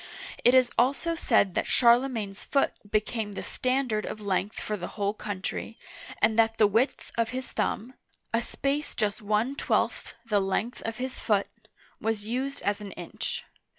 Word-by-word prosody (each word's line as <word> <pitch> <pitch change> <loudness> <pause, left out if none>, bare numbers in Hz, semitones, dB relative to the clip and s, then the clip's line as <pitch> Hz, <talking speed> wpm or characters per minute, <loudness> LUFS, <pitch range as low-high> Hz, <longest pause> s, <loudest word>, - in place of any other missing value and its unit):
It 245 +2 +7
is 255 -1 +5
also 275 +7 +2
said 225 - +3
that - - 0
Charlemagne's 235 -5 +3
foot 275 - +2 0.2
became 215 0 -1
the - - -5
standard 255 -4 0
of 215 - -5
length 200 0 -1
for 215 - -2
the 180 -3 -5
whole 200 0 +1
country, 205 +2 -4 0.4
and 220 +1 +3
that 225 0 +4
the 215 - +6
width 225 +7 +1
of 230 -1 +2
his 255 +1 -4
thumb 240 +5 -1 0.2
— - - -41
a 230 - +3
space 280 +4 -2
just 210 +2 0
one 215 +6 +1
twelfth - - 0
the 210 -3 +2
length 195 +5 -1
of 225 -1 -3
his 260 +1 -4
foot 205 -3 +2 0.3
— - - -30
was 220 -2 -1
used 260 +5 -2
as 205 +1 0
an 200 -1 -7
inch. 475 0 -4
225 Hz, 175 wpm, -28 LUFS, 210-255 Hz, 0.4 s, It